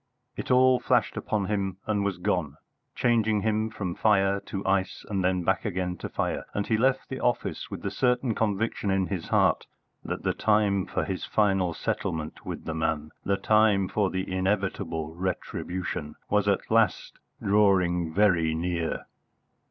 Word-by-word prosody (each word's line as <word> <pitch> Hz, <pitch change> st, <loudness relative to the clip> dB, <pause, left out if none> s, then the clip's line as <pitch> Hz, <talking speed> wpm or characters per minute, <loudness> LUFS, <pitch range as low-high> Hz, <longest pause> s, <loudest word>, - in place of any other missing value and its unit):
It -, -, -6 dB
all 130 Hz, 0 st, +5 dB
flashed 125 Hz, -2 st, +1 dB
upon 105 Hz, -2 st, -1 dB
him 95 Hz, -2 st, -2 dB
and 105 Hz, -2 st, 0 dB
was 100 Hz, -2 st, -1 dB
gone, 85 Hz, -5 st, -1 dB, 0.4 s
changing 110 Hz, -4 st, +2 dB
him 110 Hz, +1 st, 0 dB
from 100 Hz, -5 st, -4 dB
fire 100 Hz, -1 st, +3 dB
to 95 Hz, 0 st, -4 dB
ice, 95 Hz, -1 st, 0 dB
and 100 Hz, -2 st, -1 dB
then 90 Hz, -1 st, +1 dB
back 95 Hz, +1 st, +1 dB
again 90 Hz, -3 st, -2 dB
to -, -, -6 dB
fire; -, -, -2 dB
and 100 Hz, -, 0 dB
he 110 Hz, -, +1 dB
left 130 Hz, +4 st, +1 dB
the 130 Hz, -, -4 dB
office 120 Hz, -, -1 dB
with -, -, -7 dB
the -, -, -2 dB
certain 125 Hz, -1 st, +1 dB
conviction 105 Hz, -1 st, -1 dB
in 95 Hz, -1 st, +2 dB
his 90 Hz, -3 st, -4 dB
heart -, -, +2 dB, 0.4 s
that -, -, -4 dB
the -, -, +1 dB
time 105 Hz, -3 st, +2 dB
for -, -, -1 dB
his 95 Hz, -2 st, -3 dB
final 95 Hz, -5 st, +1 dB
settlement 80 Hz, -1 st, -3 dB
with -, -, -6 dB
the 80 Hz, -, -3 dB
man, 80 Hz, -1 st, -1 dB
the 100 Hz, 0 st, +1 dB
time 105 Hz, -3 st, +3 dB
for 100 Hz, -1 st, +1 dB
the 95 Hz, 0 st, -3 dB
inevitable 95 Hz, -4 st, -1 dB
retribution, 90 Hz, -2 st, -4 dB, 0.2 s
was 105 Hz, -1 st, +2 dB
at 100 Hz, +1 st, 0 dB
last 110 Hz, -4 st, +2 dB, 0.2 s
drawing 90 Hz, -5 st, +3 dB
very 85 Hz, -4 st, +3 dB
near. 85 Hz, 0 st, -2 dB
100 Hz, 165 wpm, -27 LUFS, 90-105 Hz, 0.4 s, all